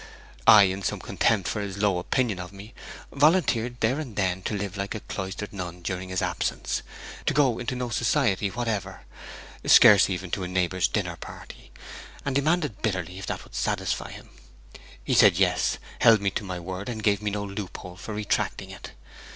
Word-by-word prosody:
I, 105 Hz, -1 st, +10 dB
in 95 Hz, 0 st, 0 dB
some -, -, -2 dB
contempt 110 Hz, -6 st, +1 dB
for 105 Hz, -, -2 dB
his 100 Hz, -1 st, -5 dB
low 100 Hz, -3 st, +1 dB
opinion 110 Hz, +1 st, 0 dB
of 90 Hz, 0 st, -7 dB
me, 100 Hz, +3 st, -12 dB, 0.4 s
volunteered, 140 Hz, -6 st, +2 dB
there 125 Hz, +6 st, +2 dB
and 130 Hz, -9 st, -6 dB
then, 95 Hz, -2 st, 0 dB
to 105 Hz, -, -3 dB
live 100 Hz, -1 st, -4 dB
like 100 Hz, +2 st, -4 dB
a 110 Hz, -, -5 dB
cloistered 95 Hz, +2 st, -6 dB
nun 90 Hz, -2 st, -6 dB
during 90 Hz, +1 st, -4 dB
his 95 Hz, 0 st, -1 dB
absence; -, -, -2 dB, 0.5 s
to -, -, +2 dB
go 130 Hz, -5 st, +3 dB
into 125 Hz, +1 st, -3 dB
no 125 Hz, -1 st, -3 dB
society 115 Hz, -3 st, +1 dB
whatever, 110 Hz, -1 st, -4 dB, 0.6 s
scarce 105 Hz, -5 st, +7 dB
even 95 Hz, -1 st, -4 dB
to -, -, -2 dB
a -, -, -3 dB
neighbour's 90 Hz, 0 st, +1 dB
dinner -, -, -2 dB
party; -, -, -11 dB, 0.6 s
and 140 Hz, -, -1 dB
demanded 150 Hz, -, 0 dB
bitterly 95 Hz, -4 st, -2 dB
if 95 Hz, -, -7 dB
that -, -, -4 dB
would -, -, -18 dB
satisfy -, -, -2 dB
him. -, -, -12 dB, 0.7 s
He -, -, -1 dB
said -, -, +6 dB
yes, -, -, +2 dB, 0.2 s
held 115 Hz, -1 st, +6 dB
me 100 Hz, 0 st, 0 dB
to 105 Hz, -, -3 dB
my 90 Hz, -2 st, -5 dB
word, 95 Hz, +5 st, -6 dB
and 110 Hz, -3 st, -5 dB
gave 100 Hz, -1 st, +2 dB
me 105 Hz, -, -1 dB
no 105 Hz, 0 st, -3 dB
loophole 100 Hz, -3 st, -7 dB
for 105 Hz, +3 st, -7 dB
retracting 105 Hz, -1 st, -2 dB
it. -, -, -10 dB
100 Hz, 185 wpm, -26 LUFS, 95-115 Hz, 0.7 s, I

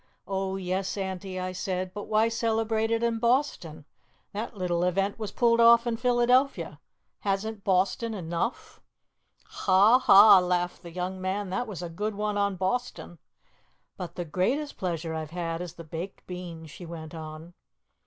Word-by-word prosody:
'Oh, 190 Hz, -1 st, -2 dB
yes, 190 Hz, +1 st, -2 dB
Auntie,' 190 Hz, -1 st, -4 dB
I 185 Hz, 0 st, -3 dB
said, 185 Hz, 0 st, -3 dB
'but 205 Hz, -, -6 dB
why 215 Hz, +1 st, +3 dB
celebrate 225 Hz, -1 st, 0 dB
it 230 Hz, 0 st, 0 dB
in 230 Hz, -1 st, +1 dB
Boston? 235 Hz, -, 0 dB, 0.5 s
That 215 Hz, +1 st, -5 dB
little 175 Hz, -2 st, 0 dB
event 195 Hz, +4 st, 0 dB
was 215 Hz, -2 st, -4 dB
pulled 235 Hz, -2 st, +3 dB
off 235 Hz, 0 st, +7 dB
in 235 Hz, -1 st, 0 dB
Philadelphia. 250 Hz, +3 st, +2 dB, 0.4 s
Hasn't 205 Hz, +1 st, -2 dB
Boston 200 Hz, +4 st, +1 dB
enough?'" 175 Hz, +5 st, -4 dB, 0.6 s
"Ha, 205 Hz, +6 st, +4 dB
ha!" 205 Hz, -4 st, +8 dB
laughed 180 Hz, 0 st, -1 dB
the 170 Hz, -, -9 dB
young 185 Hz, +2 st, -4 dB
man. 190 Hz, +1 st, -2 dB
"That 245 Hz, +6 st, -2 dB
was 190 Hz, -5 st, -6 dB
a -, -, -3 dB
good 210 Hz, +5 st, -3 dB
one 210 Hz, 0 st, -2 dB
on 200 Hz, -1 st, +1 dB
Boston." 190 Hz, -2 st, -3 dB, 0.8 s
"But 175 Hz, -2 st, -7 dB
the 175 Hz, -, -4 dB
greatest 245 Hz, -, -1 dB
pleasure 165 Hz, -3 st, -3 dB
I've 160 Hz, -1 st, -4 dB
had 165 Hz, 0 st, -3 dB
is 175 Hz, -2 st, -6 dB
the 170 Hz, -, -9 dB
baked 165 Hz, +4 st, -7 dB
beans," 170 Hz, -3 st, -8 dB
she 175 Hz, +3 st, -10 dB
went 165 Hz, -1 st, -8 dB
on. 160 Hz, +1 st, -9 dB
190 Hz, 160 wpm, -27 LUFS, 175-225 Hz, 0.8 s, ha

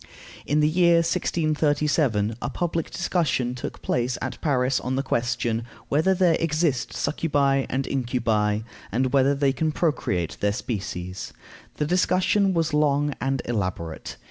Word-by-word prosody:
In 150 Hz, +2 st, +2 dB
the 150 Hz, -, +4 dB
year 170 Hz, +1 st, +4 dB
1637 150 Hz, -8 st, +1 dB
a -, -, -2 dB
public 165 Hz, -2 st, -2 dB
discussion 155 Hz, -8 st, 0 dB
took 125 Hz, -, -7 dB
place 125 Hz, 0 st, 0 dB
at -, -, -5 dB
Paris 130 Hz, -3 st, +1 dB
on 130 Hz, +1 st, -2 dB
the 135 Hz, -, 0 dB
question, 120 Hz, -2 st, -1 dB, 0.3 s
Whether 160 Hz, +7 st, +3 dB
there 175 Hz, -3 st, +3 dB
exist 155 Hz, -5 st, 0 dB
succubæ 140 Hz, -3 st, +1 dB
and 135 Hz, +1 st, -1 dB
incubi, 115 Hz, -5 st, 0 dB, 0.3 s
and 130 Hz, +1 st, 0 dB
whether 140 Hz, +1 st, +4 dB
they 140 Hz, -1 st, +2 dB
can 155 Hz, +3 st, 0 dB
procreate 95 Hz, -, -1 dB
their 105 Hz, 0 st, +1 dB
species? 95 Hz, -5 st, -5 dB, 0.4 s
The 150 Hz, -, -1 dB
discussion 185 Hz, +3 st, +2 dB
was 165 Hz, -2 st, 0 dB
long 145 Hz, -1 st, +2 dB
and 135 Hz, -1 st, -1 dB
elaborate. 90 Hz, -8 st, -3 dB
140 Hz, 140 wpm, -25 LUFS, 120-160 Hz, 0.4 s, the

